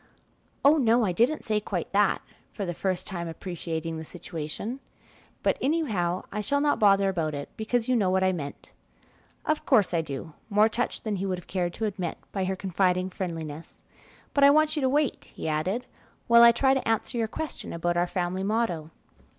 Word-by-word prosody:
"Oh, 295 +3 +7
no, 235 -3 +4
I 185 - +1
didn't 240 - +1
say 215 -1 +1
quite 195 -4 -4
that," 205 0 +2 0.3
for 200 - -3
the 175 - -3
first 185 +1 -2
time 170 -3 -4
appreciating 165 -1 -4
the - - -6
situation; 175 - -6 0.6
"but - - +2
anyhow 215 - 0
I 210 - -2
shall 285 +6 +1
not 290 0 +2
bother 195 -2 +5
about 165 -5 -1
it, 140 0 -6
because 225 +1 -1
you 255 - +3
know 200 -5 +2
what 190 0 +2
I 185 - +4
meant." 145 -6 -7 0.7
"Of 310 0 0
course 215 -9 +3
I 165 - +2
do," 150 0 -6 0.2
more 210 +1 +4
touched 240 +3 -2
than 215 -3 -2
he 195 +1 -2
would 185 -1 -1
have 180 - -11
cared 175 -2 -2
to 225 - -2
admit 190 -5 -3
by 195 -2 -1
her 190 +1 -1
confiding 185 -1 0
friendliness; 165 -4 -6 0.5
"but 280 - +3
I 280 - +9
want 310 +1 +4
you 300 - -1
to 260 - +2
wait," 290 0 0
he - - -7
added, 185 +11 -1 0.4
"while 235 0 +7
I 235 0 +10
try 265 +3 +3
to 265 - -1
answer 225 +2 0
your 225 - +1
question 310 +7 -6
about 175 +1 -1
our 175 +1 +2
family 180 +1 -2
motto. 195 -7 -1
195 Hz, 200 wpm, -27 LUFS, 175-235 Hz, 0.7 s, I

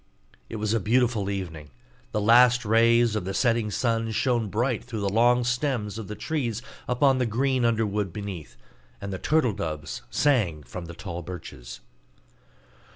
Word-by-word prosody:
It - - -6
was 105 0 -1
a 115 - +2
beautiful 115 -1 +1
evening; 85 -7 -5 0.4
the 105 - -1
last 120 +3 +5
rays 115 +1 +4
of 110 - -1
the 95 +1 -4
setting 115 -2 +1
sun 115 +1 0
shone 115 -1 0
bright 120 +3 -1
through 115 -4 -5
the 100 - 0
long 120 +4 +3
stems 125 -4 -1
of 110 - -7
the 105 - -6
trees 125 -8 -2 0.3
upon 130 +1 +3
the 125 - +1
green 130 +3 +1
underwood 105 -4 0
beneath, 95 -5 -7 0.4
and 100 -1 -5
the 95 - -4
turtle 150 -7 +2
doves 75 -5 -5
sang 100 - +1
from 85 +8 -8
the 85 0 -9
tall 85 -1 -6
birches. 70 -8 -9
110 Hz, 160 wpm, -26 LUFS, 95-120 Hz, 0.4 s, last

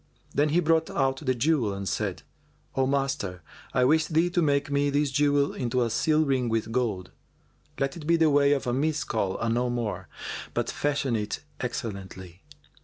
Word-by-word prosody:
Then 145 +2 +2
he 165 +4 +3
brought 160 0 +2
out 135 -1 +1
the 130 -3 -1
jewel 125 -5 +1
and 100 0 -5
said, - - -2 0.5
"O 130 0 +2
master, 135 - -1 0.3
I 125 - +3
wish 155 +3 +3
thee 165 +2 +2
to 175 - +2
make 145 -2 +1
me 140 0 +2
this 145 0 +1
jewel 145 0 +2
into 125 0 0
a 115 - -1
seal 155 +5 +2
ring 130 -4 +1
with 115 0 -1
gold. 110 -7 -1 0.7
Let 135 0 0
it 155 -3 -8
be 170 - +5
the 160 -2 +4
weight 140 0 +5
of 140 - -1
a 120 - 0
Miskal 135 -8 0
and 115 0 0
no 125 +1 +1
more, 105 -7 -3 0.5
but - - 0
fashion 140 -4 0
it 105 -1 -3 0.2
excellently." 95 -7 -6
135 Hz, 180 wpm, -27 LUFS, 115-145 Hz, 0.7 s, be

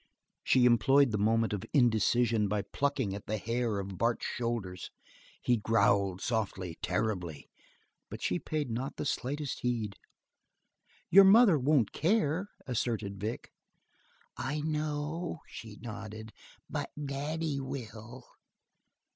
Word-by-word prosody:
She 130 -2 +4
employed 125 +3 +5
the 105 - -1
moment 115 +1 +2
of 100 - -3
indecision 115 -3 +3
by 105 0 -1
plucking 135 -8 -1
at 100 - -7
the 110 - -1
hair 115 +1 -1
of 95 -2 -5
Bart's 115 0 +1
shoulders; 115 -7 -3 0.5
he 120 - +3
growled 100 -4 +2
softly, 95 -7 -2
terribly, 90 -6 -2 0.6
but - - -7
she 90 - -1
paid 150 -5 -3
not 125 +5 -3
the - - -4
slightest 145 +1 -2
heed. 115 -4 -1 1.2
"Your 195 +3 +10
mother 195 -4 +7
won't 135 -4 +3
care," 170 0 +1 0.2
asserted 110 -5 -2
Vic. 110 +4 -4 0.9
"I 150 +4 -2
know," 155 +2 -2
she 110 -2 -10
nodded, 110 -1 -8 0.3
"but - - -3 0.2
Daddy 145 +2 -2
will." 120 -2 -7
120 Hz, 120 wpm, -31 LUFS, 105-140 Hz, 1.2 s, Your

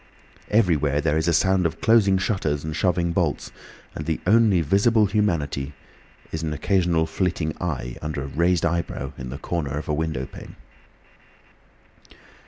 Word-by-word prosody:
Everywhere 80 -9 +2
there 75 0 +1
is 80 +1 0
a - - +4
sound 95 +1 +3
of 80 0 -8
closing 110 -4 +4
shutters 95 -7 -1
and 80 0 -4
shoving 90 -2 +1
bolts, - - -1 0.4
and 75 - -6
the 80 - -1
only 105 -2 +4
visible 105 +7 +3
humanity 85 -9 -1 0.6
is 80 - -3
an 80 -1 -2
occasional 85 +1 +1
flitting 85 -3 -2
eye 70 -8 -3
under 75 -2 -3
a - - -5
raised 85 +5 +1
eyebrow 85 0 -2
in 65 -1 -6
the 65 - -6
corner 75 -3 -3
of 75 - -5
a 75 - 0
window 80 -4 -2
pane. - - -11
85 Hz, 155 wpm, -23 LUFS, 75-95 Hz, 0.6 s, a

